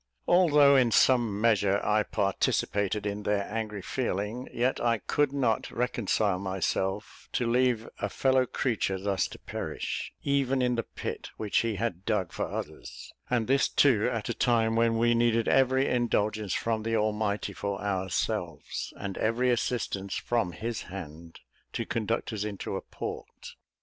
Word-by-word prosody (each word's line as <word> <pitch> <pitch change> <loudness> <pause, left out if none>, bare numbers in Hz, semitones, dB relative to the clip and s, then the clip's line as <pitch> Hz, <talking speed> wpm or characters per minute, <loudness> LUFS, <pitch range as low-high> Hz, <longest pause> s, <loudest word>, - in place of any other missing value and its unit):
Although 150 -6 +6
in 125 -3 +4
some 115 -3 +3
measure 100 -3 +3
I 105 0 +3
participated 100 +1 0
in 100 0 -2
their 105 -1 0
angry 105 -3 -3
feeling, 115 0 -3
yet 125 +2 0
I 115 -1 +2
could 145 +5 0
not 135 -5 0
reconcile 110 -5 0
myself 95 +1 -2
to 125 - 0
leave 120 -1 +2
a 105 - -1
fellow 130 +3 +2
creature 110 -7 -1
thus 100 0 0
to - - -11
perish, - - -4
even 135 -1 +1
in 125 -1 +2
the 115 - 0
pit - - -6
which 105 -2 +1
he 115 -2 -1
had 100 -4 -3
dug 100 -5 0
for - - -2
others, - - -7 0.2
and 120 -3 +1
this 135 +3 +3
too 125 -6 +4
at 115 -3 -3
a 120 - -1
time 115 -1 +2
when 115 0 +3
we 120 +1 +3
needed 115 -1 +2
every 130 0 +3
indulgence 110 -4 0
from 115 -1 -1
the 115 +1 -1
Almighty 105 -1 -1
for 100 -1 -3
ourselves, 95 -2 -2
and 100 -1 -5
every 120 +3 +2
assistance 110 -5 -1
from 115 -7 -1
his 115 +3 -4
hand 85 -3 -9 0.3
to - - -2
conduct 115 +1 -2
us 105 -1 -2
into 105 -2 -4
a - - -3
port. - - -8
110 Hz, 155 wpm, -28 LUFS, 100-120 Hz, 0.3 s, Although